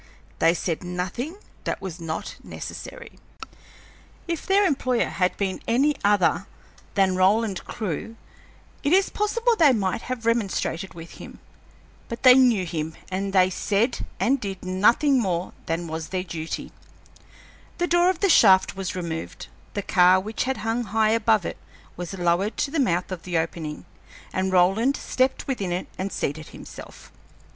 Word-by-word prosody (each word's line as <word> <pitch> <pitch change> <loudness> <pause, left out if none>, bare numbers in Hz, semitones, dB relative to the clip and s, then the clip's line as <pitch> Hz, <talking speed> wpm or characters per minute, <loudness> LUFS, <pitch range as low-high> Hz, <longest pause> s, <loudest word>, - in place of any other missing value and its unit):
They 165 +1 +4
said 170 0 -2
nothing 180 - -4 0.3
that - - -2
was 185 -2 -7
not 160 -1 -5
necessary. - - -9 1.1
If 335 -2 -3
their 395 +1 +4
employer 255 -7 +1
had 180 -1 0
been 195 -2 -2
any 280 +6 +3
other 205 -3 +4
man 180 - -3 0.5
than 190 -2 +3
Roland 195 +2 +2
Clewe 215 +1 -4 0.7
it 290 +3 +1
is 385 +1 +4
possible 460 +3 +1
they 305 -9 +5
might 200 -1 -1
have 250 -2 -5
remonstrated 195 -6 -1
with 165 0 -11
him. - - -10 0.7
But 235 - -6
they 255 -1 +10
knew 245 -7 +4
him, 160 -1 -4 0.2
and 195 +1 -2
they 185 -1 +4
said 210 +6 0 0.2
and 270 +3 +2
did 195 -4 -6
nothing 235 +9 +3
more 185 -5 -1
than 165 +1 -1
was 160 -1 -5
their 185 -1 -2
duty. 165 -3 -5 1.1
The 350 - +1
door 350 +1 +4
of 370 -3 -1
the 400 - +4
shaft 190 - +6
was 190 -1 -4
removed, 165 -3 -5 0.3
the 205 - -2
car 180 0 +5
which 215 +5 -3
had 265 0 -1
hung 230 +2 0
high 215 +1 +2
above 220 -4 +2
it - - -4 0.4
was 175 +2 -6
lowered 180 +4 0
to 280 - -1
the 320 - -1
mouth 180 -8 +1
of 180 -3 -4
the 175 -2 -2
opening, 160 -2 -3 0.5
and 190 0 0
Roland 195 +9 +3
stepped 260 +1 0
within 205 -10 -2
it 180 +1 -2
and 195 +1 -4
seated 155 +2 -3
himself. - - -12
195 Hz, 160 wpm, -24 LUFS, 180-250 Hz, 1.1 s, they